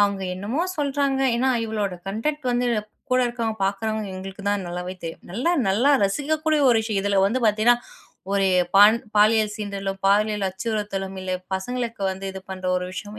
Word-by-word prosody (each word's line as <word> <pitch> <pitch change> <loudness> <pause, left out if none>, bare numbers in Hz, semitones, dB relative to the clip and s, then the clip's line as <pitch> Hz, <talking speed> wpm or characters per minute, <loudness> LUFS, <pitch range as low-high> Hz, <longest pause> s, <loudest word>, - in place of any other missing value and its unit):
அவுங்க 200 -1 +2
என்னமோ 220 - -2
சொல்றாங்க. 280 -2 0 0.2
ஏன்னா 260 +2 +1 0.2
இவளோட 210 -4 -2
கன்டன்ட் 265 +9 -2
வந்து 245 0 +1 0.4
கூட 255 - +4
இருக்கிறவங்க, 230 -2 -3
பாக்குறவங்க 210 +1 -2
எங்களுக்குதான் 195 +1 -3
நல்லாவே 180 +1 -5
தெரியும். 165 - -7
நல்லா 245 - 0 0.2
நல்லா 235 +9 +3
ரசிக்கக்கூடிய 305 +7 0
ஒரு 230 - +4
விஷயம். 215 -3 -1
இதுல 200 -1 +2
வந்து 250 +6 0
பாத்தீங்கன்னா 215 +3 +4 0.6
ஒரு 200 -1 +2 0.3
பான் 210 +3 +8 0.2
பாலியல் 215 0 +4
சீண்டலும், 200 -2 -4
பாலியல் 210 0 +2
அச்சுறுத்தலும் 195 -1 -3
இல்ல. 185 - -3 0.2
பசங்களுக்கு 230 +2 -3
வந்து 190 +1 -6
இது 190 - -7
பண்ற 185 -1 -7
ஒரு 180 0 -2
விஷயம். 210 +3 -7
210 Hz, 155 wpm, -23 LUFS, 195-240 Hz, 0.6 s, பான்